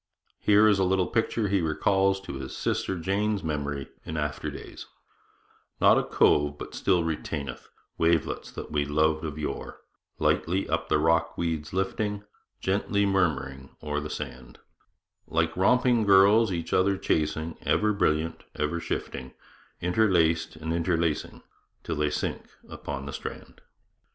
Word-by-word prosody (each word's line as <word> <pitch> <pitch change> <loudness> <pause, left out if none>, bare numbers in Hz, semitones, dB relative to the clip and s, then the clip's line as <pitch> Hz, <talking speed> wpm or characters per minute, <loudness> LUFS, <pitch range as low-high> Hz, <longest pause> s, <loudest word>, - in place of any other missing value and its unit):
Here 105 +1 +5
is 105 -2 +4
a - - +3
little 95 0 +2
picture 115 0 0
he 100 -1 +2
recalls 95 +4 +2
to 95 - -7
his 65 - -6
sister 95 - -1
Jane's 100 +4 0
memory 70 -3 -3 0.2
in 80 - -5
after 75 -1 -2
days: - - -9 0.9
Not - - +6
a - - -1
cove 75 0 +3
but - - -8
still 90 -3 +2
retaineth 75 -3 -4 0.3
Wavelets 80 -2 +1
that - - -7
we 75 -1 +1
loved 75 +2 +1
of 75 -2 -4
yore, 75 -2 -5 0.4
Lightly 95 +4 +1
up - - -1
the - - +4
rock 80 +1 +2
weeds 80 -3 -2
lifting, 100 +2 -2 0.4
Gently 100 +1 +1
murmuring 70 -9 -1
o'er 75 -1 -1
the 75 +1 -6
sand; 65 -3 -7 0.7
Like 85 0 0
romping 120 +4 +3
girls 100 +2 +6
each 85 -2 -3
other 95 +1 +3
chasing, 80 -1 -1
Ever 105 0 +2
brilliant, 80 -4 0
ever 75 +3 -1
shifting, 65 -5 -5 0.5
Interlaced 85 -4 +2
and 80 +1 -4
interlacing, 85 -2 -1 0.4
Till - - -3
they 75 0 +1
sink - - -3 0.2
upon 70 - -6
the 70 - -6
strand. - - -8
85 Hz, 140 wpm, -27 LUFS, 75-95 Hz, 0.9 s, Not